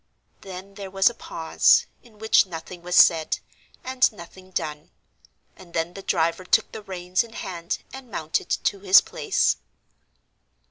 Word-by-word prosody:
Then 190 Hz, +1 st, -9 dB
there 195 Hz, -1 st, -8 dB
was 195 Hz, +4 st, +3 dB
a -, -, -13 dB
pause, 165 Hz, -7 st, +2 dB, 0.2 s
in 225 Hz, -3 st, -21 dB
which 220 Hz, -2 st, +4 dB
nothing 170 Hz, +1 st, -8 dB
was 180 Hz, +1 st, -3 dB
said, 160 Hz, -2 st, +5 dB, 0.5 s
and 260 Hz, 0 st, +2 dB
nothing 185 Hz, -1 st, -13 dB
done; 150 Hz, -4 st, -4 dB, 0.7 s
and 175 Hz, -2 st, -15 dB
then 165 Hz, +2 st, -1 dB
the 195 Hz, -, -8 dB
driver 170 Hz, -1 st, 0 dB
took 220 Hz, +4 st, +2 dB
the 220 Hz, -, -8 dB
reins 185 Hz, -1 st, -1 dB
in 230 Hz, -1 st, -14 dB
hand 170 Hz, -5 st, -4 dB, 0.2 s
and 265 Hz, -2 st, -10 dB
mounted 160 Hz, -4 st, -2 dB
to 200 Hz, -, 0 dB
his 190 Hz, -1 st, +7 dB
place. 425 Hz, -3 st, 0 dB
185 Hz, 150 wpm, -24 LUFS, 170-205 Hz, 0.7 s, his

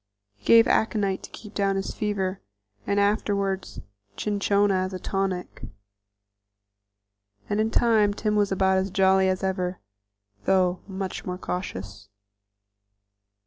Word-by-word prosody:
He 100 Hz, -, -30 dB
gave 230 Hz, 0 st, +7 dB
aconite 205 Hz, -4 st, +1 dB
to -, -, -10 dB
keep 210 Hz, -1 st, -11 dB
down 195 Hz, -1 st, +1 dB
his 195 Hz, 0 st, -3 dB
fever, 195 Hz, -3 st, -2 dB, 0.5 s
and 200 Hz, -, +2 dB
afterward 200 Hz, -2 st, 0 dB, 0.5 s
cinchona 205 Hz, -1 st, +1 dB
as 185 Hz, 0 st, -1 dB
a 185 Hz, -, -4 dB
tonic, 190 Hz, -1 st, -3 dB, 1.9 s
and 205 Hz, -, -1 dB
in 220 Hz, +1 st, +2 dB
time 220 Hz, -3 st, +3 dB
Tim 210 Hz, 0 st, -1 dB
was 205 Hz, -1 st, +2 dB
about 190 Hz, 0 st, +3 dB
as 190 Hz, +1 st, -1 dB
jolly 190 Hz, 0 st, +3 dB
as 185 Hz, +1 st, -1 dB
ever, 185 Hz, -1 st, -1 dB, 0.7 s
though 185 Hz, -2 st, +2 dB
much 190 Hz, -1 st, -5 dB
more 180 Hz, -1 st, -4 dB
cautious. 100 Hz, -, -6 dB
195 Hz, 125 wpm, -25 LUFS, 185-205 Hz, 1.9 s, gave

